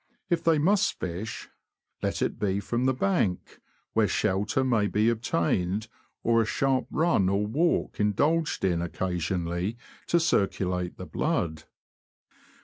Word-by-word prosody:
If 170 -1 +1
they 165 -1 +4
must 190 +7 +2
fish, 95 +6 -5 0.5
let - - -1
it - - -2
be 100 -1 0
from 120 +4 -1
the 130 - +3
bank, 130 - 0 0.3
where 110 -1 +3
shelter 105 +6 0
may 115 -5 +2
be 105 +3 +2
obtained, 100 -1 0 0.3
or 115 0 +4
a - - +1
sharp 130 +3 0
run 155 - +2
or 100 +2 +1
walk 155 +11 0
indulged 145 +9 +1
in 85 -3 +1
occasionally 90 +3 -2 0.3
to 170 - +3
circulate 90 - 0
the - - -7
blood. 80 -2 -2
105 Hz, 135 wpm, -27 LUFS, 95-130 Hz, 0.5 s, they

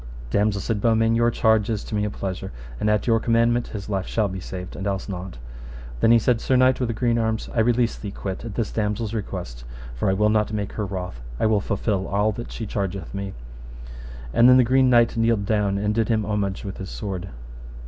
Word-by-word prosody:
Damosel, 105 -1 +1
said 105 -1 -2
Beaumains, 115 0 +3
your 115 0 +3
charge 110 -2 +2
is 110 -2 -1
to - - -9
me 105 0 +1
a - - -1
pleasure, 95 -1 -5 0.3
and 105 - +1
at 105 -1 +1
your 115 -2 +3
commandment 115 +1 +2
his 100 -3 -7
life 95 -3 -2
shall 110 -2 +1
be 95 0 -5
saved, 90 0 -7
and 95 - -4
else 95 -1 -2
not. 95 - -6 0.6
Then 115 - +4
he 115 - +7
said, 115 +1 +1
Sir 130 - +1
knight 130 0 +4
with 125 - 0
the 115 - -1
green 120 0 +1
arms, 110 -1 -1
I 120 - 0
release 120 +1 +2
thee 105 - -5
quit 95 -1 -5
at 115 -4 -6
this 115 -3 -1
damosel's 105 0 -2
request, 90 - -5 0.3
for - - -1
I - - +3
will 105 +2 +2
not 105 0 +1
make 105 -1 -3
her 105 -2 -3
wroth, 90 -10 -5 0.2
I - - +2
will 110 -2 +3
fulfil 100 -1 -1
all 105 +2 +1
that 120 +3 -7
she 115 - -5
chargeth 100 -3 -4
me. 100 -1 -5 1.0
And 120 +2 +6
then 125 - +8
the 130 - +6
Green 130 +2 +4
Knight 120 -1 +4
kneeled 115 -3 +2
down, 105 -2 +1
and 105 +1 0
did 115 +1 0
him 110 -2 +1
homage 100 -2 -2
with 95 - -5
his 95 -2 -6
sword. 95 -2 -5
105 Hz, 230 wpm, -23 LUFS, 100-115 Hz, 1.0 s, then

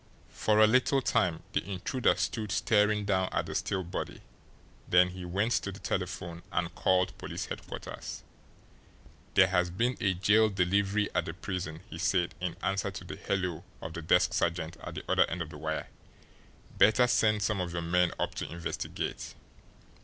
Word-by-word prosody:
For 105 -1 +1
a 110 - +8
little 130 +4 +3
time 90 -9 +1
the - - +1
intruder 100 +7 0
stood 110 -4 -2
staring 105 0 +2
down 95 -2 +1
at - - 0
the - - -6
still 95 -1 -1
body, 85 - -5 0.7
then 90 0 +6
he 90 0 -7
went 100 +6 0
to 100 - -4
the 95 - -9
telephone 90 -2 -3
and 85 -1 -1
called 90 0 +2
police - - -4
headquarters. - - -7 1.1
"There 95 - +8
has 90 -1 +1
been 120 +8 0
a 95 -2 +2
jail 110 +4 +4
delivery 100 +2 +1
at 90 -2 +1
the 80 - -5
prison," 90 -4 -4
he 80 - -8
said 90 -2 +1
in 90 -2 -2
answer 100 -1 0
to - - -7
the - - -7
"hello" 90 -5 -2 0.2
of 80 - -7
the 85 - -5
desk 80 - +3
sergeant 85 -1 0
at - - -8
the - - -5
other - - +3
end 85 0 -2
of 80 - -11
the 75 - -9
wire. 80 -1 -3 0.9
"Better 115 +4 +6
send 105 -4 +3
some 100 -2 0
of 90 -1 -3
your 85 0 -3
men 90 +1 +2
up - - -1
to - - -5
investigate." 85 0 -4
90 Hz, 175 wpm, -30 LUFS, 85-105 Hz, 1.1 s, a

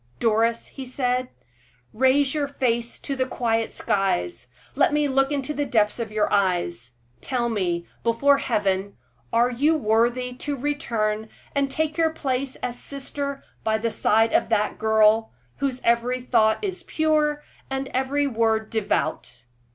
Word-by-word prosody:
"Doris," 230 +1 +2
he 270 - -8
said, 250 0 -1 0.6
"raise 265 +3 +3
your 295 -2 0
face 240 -4 -1
to 275 - -4
the 260 -1 0
quiet 225 -3 0
skies; 120 - -1 0.3
let 290 +1 +3
me 295 0 +2
look 270 +1 +2
into 285 +1 -2
the 290 - -1
depths 215 -5 +1
of 225 -2 -4
your 215 -1 +1
eyes. 175 - 0 0.3
Tell 240 -2 -1
me, 175 -6 -1 0.2
before 275 +5 +3
Heaven, 200 -4 -1 0.3
are 240 +2 +3
you 295 +6 +2
worthy 240 +1 +1
to 285 0 -3
return 220 -6 -1 0.2
and 280 -1 +1
take 310 +2 -2
your 325 -1 +4
place 270 -4 -2
as 245 -1 -3
sister 280 0 -5 0.2
by 220 0 +1
the 230 +1 -1
side 225 +1 +2
of - - +2
that 210 -2 0
girl, 220 0 +3 0.2
whose 265 -2 -2
every 235 +2 +2
thought 220 - +2
is 375 -3 -3
pure, 305 -3 +1 0.3
and 270 0 -2
every 270 +3 0
word 225 -4 0
devout?" 155 - -2
245 Hz, 150 wpm, -24 LUFS, 220-275 Hz, 0.6 s, your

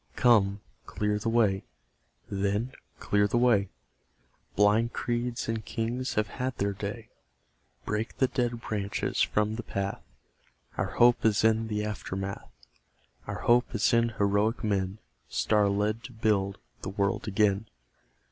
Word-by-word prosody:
Come, 100 -5 +4 0.3
clear 105 0 -1
the 115 - -1
way, 105 -5 +2 0.6
then, 100 +5 -1 0.3
clear 105 0 +2
the 110 - 0
way; 115 -6 +3 0.9
Blind 105 +3 +3
creeds 120 0 -2
and 115 -1 -2
kings 120 +4 -3
have 105 - +2
had 130 +3 -4
their 100 0 0
day; 105 +3 -6 0.8
Break 110 +3 -3
the 130 - +4
dead 120 -2 -1
branches 100 -3 -2
from 105 +1 +1
the - - -3
path; 100 -3 -3 0.7
Out 95 0 -2
Hope 120 0 +5
is 110 -2 +3
in 110 0 +3
the 105 -1 -2
aftermath 100 -2 -5 0.8
Our - - -4
hope 120 +1 +3
is 115 - +2
in 115 0 +4
heroic 105 +4 +1
men 100 -2 0 0.3
Star 105 -2 +2
led 105 +3 0
to 125 - -9
build 100 -3 +1 0.2
the - - -4
world 100 +2 -1
again. 105 +1 +2
105 Hz, 140 wpm, -28 LUFS, 100-115 Hz, 0.9 s, Hope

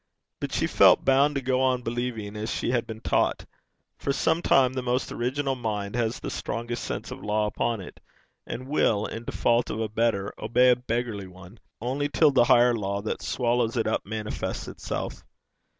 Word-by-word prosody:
But - - -4
she - - 0
felt - - +5
bound 140 +2 +4
to 140 - -1
go 130 0 +1
on 130 -1 +1
believing 115 -3 -3
as 105 +1 -4
she - - -1
had 120 -2 0
been 110 0 -7
taught; - - +1 0.5
for 140 - -1
sometimes 140 -4 +3
the 130 - -1
most 125 +1 -1
original 135 +3 -1
mind 105 -4 -3
has 115 -1 -1
the - - -5
strongest 120 0 -4
sense - - -5
of - - -8
law 105 0 +1
upon 115 +1 -1
it, 90 - -11 0.5
and 125 +2 -6
will, 110 -7 +2
in 115 +1 -6
default 120 +1 +1
of 110 - -3
a 110 - 0
better, 110 -2 0
obey 125 +2 +4
a - - +5
beggarly 120 -5 -3
one 95 +3 -14 0.2
only 135 +5 -1
till 150 0 +4
the 125 -3 +4
higher 120 +1 +5
law 100 -2 -2
that 110 - -3
swallows 120 -1 0
it 115 - +1
up 110 - 0
manifests 110 +1 -4
itself. - - -5
120 Hz, 185 wpm, -26 LUFS, 110-125 Hz, 0.5 s, felt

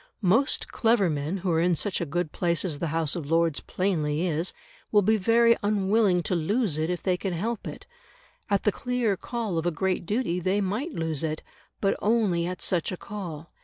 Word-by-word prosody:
Most 225 +9 +2
clever 225 -6 +2
men 150 +5 -2
who 185 -1 -1
are 160 - +2
in 175 +1 +3
such 195 +4 0
a 170 - -2
good 165 +1 -2
place 170 0 0
as 155 -6 -2
the 170 - -1
House 160 -1 -1
of 155 -5 -5
Lords 165 -2 +2
plainly 165 -4 -1
is, 165 +1 0 0.4
will 205 -1 +5
be 220 +3 +4
very 230 +3 +4
unwilling 205 -2 +2
to 185 - -2
lose 180 - +1
it 160 +2 0
if 180 -1 -3
they 185 -2 +2
can 190 0 -3
help 215 +6 -3
it; - - -8 0.6
at 200 -1 +1
the 210 - +3
clear 245 -2 0
call 215 -4 -3
of 165 - -2
a - - +4
great 180 +2 -1
duty 210 -5 0
they 185 +3 +1
might 210 - -2
lose 160 -3 -2
it, 155 -1 -3 0.4
but 195 - +1
only 205 -6 +2
at 180 0 -4
such 175 -3 +1
a 185 - -4
call. 170 -7 -7
185 Hz, 205 wpm, -26 LUFS, 165-210 Hz, 0.6 s, will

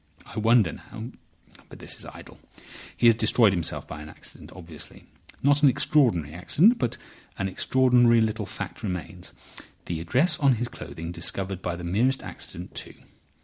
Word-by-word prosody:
I 110 - -6
wonder 110 -5 +4
now—But 115 +2 -13
this - - -5
is - - -7
idle. - - -12 0.6
He - - +1
has 115 - +8
destroyed 110 -1 +4
himself 85 -4 -1
by 75 - -8
an 75 - -9
accident, - - -11
obviously. 85 -4 -10 0.4
Not 145 +1 +4
an 145 - +7
extraordinary 115 - +2
accident. 170 - +3
But 120 - -1 0.4
an 100 - -1
extraordinary 120 +3 +4
little 110 -2 0
fact - - -7
remains: 90 -2 -5 0.5
the 85 -2 -3
address 145 - +2
on 140 -3 +4
his 120 +2 -3
clothing 85 -7 -8
discovered 95 +1 -1
by 90 -1 -3
the 90 - -8
merest 115 +10 +1
accident, 90 +2 -8
too. - - -7
110 Hz, 155 wpm, -26 LUFS, 90-125 Hz, 0.6 s, has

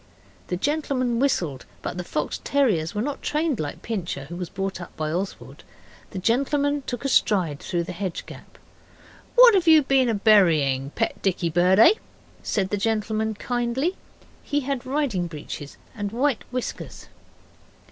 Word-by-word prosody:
The 180 - -2
gentleman 255 - 0
whistled, 170 - 0 0.2
but - - -4
the 180 - -4
fox 150 -3 -3
terriers 210 - +1
were 210 - 0
not 285 +1 -4
trained 300 -4 0
like 145 -1 -5
Pincher, 175 -10 -4
who 170 - -8
was 175 -1 -5
brought 195 -1 -4
up 175 - -11
by 155 -1 -2
Oswald. 185 +4 -5 0.5
The 195 - -8
gentleman 280 +7 +1
took 245 +2 -4
a - - +3
stride 185 - +2
through 175 -2 -2
the 170 - -6
hedge 185 0 -4
gap. - - -13 0.8
'What - - +9
have 370 -4 +2
you 315 -2 +7
been 260 -5 +2
burying 160 - +4
pet 225 - -1
dicky 180 -3 0
bird, 180 +3 +4
eh?' 230 - +8 0.5
said 190 -3 -1
the 205 - +1
gentleman, 220 +1 -1
kindly. 245 - -1 0.5
He 290 0 -1
had 265 -2 -3
riding 260 -11 0
breeches 150 -2 -8 0.2
and 205 -2 -4
white 255 +2 0
whiskers. 250 0 -5
215 Hz, 155 wpm, -24 LUFS, 175-270 Hz, 0.8 s, What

